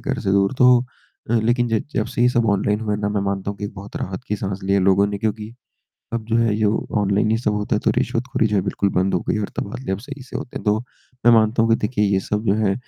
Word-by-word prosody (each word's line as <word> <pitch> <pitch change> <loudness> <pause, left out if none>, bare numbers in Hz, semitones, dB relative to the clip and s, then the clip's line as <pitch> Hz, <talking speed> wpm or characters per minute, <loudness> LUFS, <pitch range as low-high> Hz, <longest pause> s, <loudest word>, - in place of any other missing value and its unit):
घर - - -2
से 95 - 0
दूर। 100 +3 +2
तो 125 -1 +7 0.5
अ, - - +1
लेकिन 120 +1 +1
ज 115 -2 0
जब 110 - 0
से 120 0 -1
ये 125 - +5
सब 120 -2 +1
ऑनलाइन 105 +1 +1
हुए 105 -2 -1
ना, 105 0 -1
मैं 105 -1 -1
मानता 100 0 -2
हूँ 100 - -7
कि - - -4
एक 100 - -5
बहुत 100 +1 -9
राहत 95 +4 -4
की 105 - 0
साँस 95 -1 -4
ली 95 - 0
है 100 - +4
लोगों 95 +1 +4
ने, 100 0 -4
क्योंकि 110 +1 -3 0.6
अब 115 -1 -2
जो 115 0 +1
है, 115 -2 +2
यो 110 0 0
ऑनलाइन 100 +1 +1
ही 110 - +3
सब 110 -3 0
होता 105 0 -1
है - - -1
तो - - +4
रिश्वतखोरी, 115 -1 0
जो 105 -1 0
है, 95 - +2
बिल्कुल 100 +1 0
बंद 95 +2 +1
हो - - +1
गई - - +1
और 105 - -2
तबादले 100 +1 -4
अब 95 - -2
सही 140 +4 -9
से 130 - -7
होते - - -8
हैं। - - -5
तो 105 0 +2 0.5
मैं 120 - +8
मानता 115 0 +4
हूँ 115 - +2
कि 115 - +5
देखिए, 105 -1 0
ये 100 -1 +2
सब 105 +3 -3
जो 100 - +3
है, 105 -2 +1
105 Hz, 290 wpm, -21 LUFS, 100-115 Hz, 0.6 s, मैं